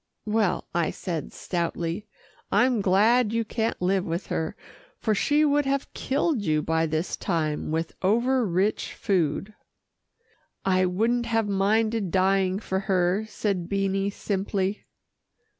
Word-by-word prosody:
"Well," 210 -4 0
I 170 -2 +1
said 165 -4 -4
stoutly, 170 +2 -3 0.4
"I'm 245 -3 +3
glad 210 +5 +4
you 230 0 0
can't 225 +1 -2
live 185 +1 +1
with 170 +1 -3
her, 160 0 -2 0.4
for 220 - 0
she 295 +8 +3
would 290 -1 +2
have 275 0 -1
killed 280 -1 0
you 155 -5 +1
by 160 0 +1
this 160 +3 -1
time 155 -6 -1
with 160 +1 -2
over 240 +6 +2
rich 195 +1 0
food." 190 +1 0 1.1
"I 185 -1 +3
wouldn't 230 +6 +1
have 225 -2 +1
minded 210 +1 +1
dying 190 +1 +2
for 190 -2 -2
her," 185 +3 +2
said 195 -4 -2
Beanie 195 0 0
simply. 195 0 -2
195 Hz, 130 wpm, -26 LUFS, 180-220 Hz, 1.1 s, glad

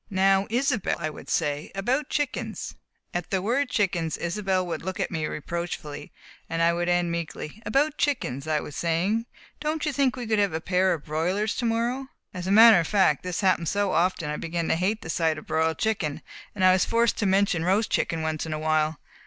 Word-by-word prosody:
"Now, 195 0 +3
Isobel," 245 -2 +1
I 155 -2 -3
would - - -11
say, 145 0 -1
"about 255 +9 0
chickens 290 -3 -3 0.2
" - - -46
At 175 -1 -3
the 190 - +1
word 250 +8 0
"chickens" 175 -8 0
Isobel 185 +1 -1
would 175 - -4
look 185 +2 -5
at - - -1
me 160 -3 -2
reproachfully, 155 -2 -5 0.4
and 165 - -2
I 170 0 +4
would 175 +1 -1
end 175 -1 +2
meekly: 170 +3 -5
"About 295 +2 +1
chickens, 140 - -1
as - - -1
I 150 - +1
was 150 - -8
saying. 185 +8 0 0.3
Don't 305 +1 -2
you 300 - -1
think 270 -2 +2
we 245 -2 -5
could 220 -1 +1
have 200 -4 +2
a 160 - -1
pair 185 +2 +2
of 150 - -12
broilers 180 +8 -1
to 245 - -1
morrow?" 235 +4 0 0.3
As 180 -1 -5
a - - 0
matter 220 -1 +8
of 165 - -1
fact, 190 -9 +3
this 180 -2 -3
happened 185 -4 +2
so 200 -1 0
often 170 -2 +1
that - - -2
I - - -3
began 165 0 -3
to - - +3
hate 195 +6 -1
the 160 - -8
sight 160 -2 +1
of 155 - -8
a - - -27
broiled 160 +1 +1
chicken, 195 -10 -1 0.3
and 190 - -2
was 185 0 +5
forced 230 0 +1
to 205 - +1
mention 190 -3 +2
roast 200 +5 +1
chicken 165 -1 0
once 155 0 -2
in 160 - -3
a - - -2
while. 155 0 +1
185 Hz, 225 wpm, -26 LUFS, 160-220 Hz, 0.4 s, matter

